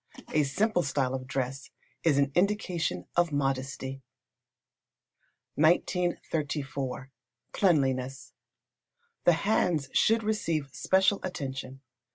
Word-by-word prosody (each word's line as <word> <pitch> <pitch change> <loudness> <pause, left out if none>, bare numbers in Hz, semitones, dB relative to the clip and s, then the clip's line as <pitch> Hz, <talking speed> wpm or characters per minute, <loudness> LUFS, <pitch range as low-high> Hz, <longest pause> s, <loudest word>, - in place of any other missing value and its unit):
A 155 - +4
simple 180 +8 +1
style 130 -3 0
of 130 -1 -4
dress 130 +1 -3 0.3
is 155 -4 +3
an 140 0 +2
indication 175 - 0
of 175 -1 +3
modesty. 135 -1 -2 1.5
1934. 150 -5 0 0.4
Cleanliness. 135 -8 +1 0.9
The 175 - +7
hands 170 -6 +1
should 225 0 +3
receive 165 -10 -1
special 190 +1 +3
attention. 135 -6 -5
145 Hz, 90 wpm, -29 LUFS, 135-175 Hz, 1.5 s, The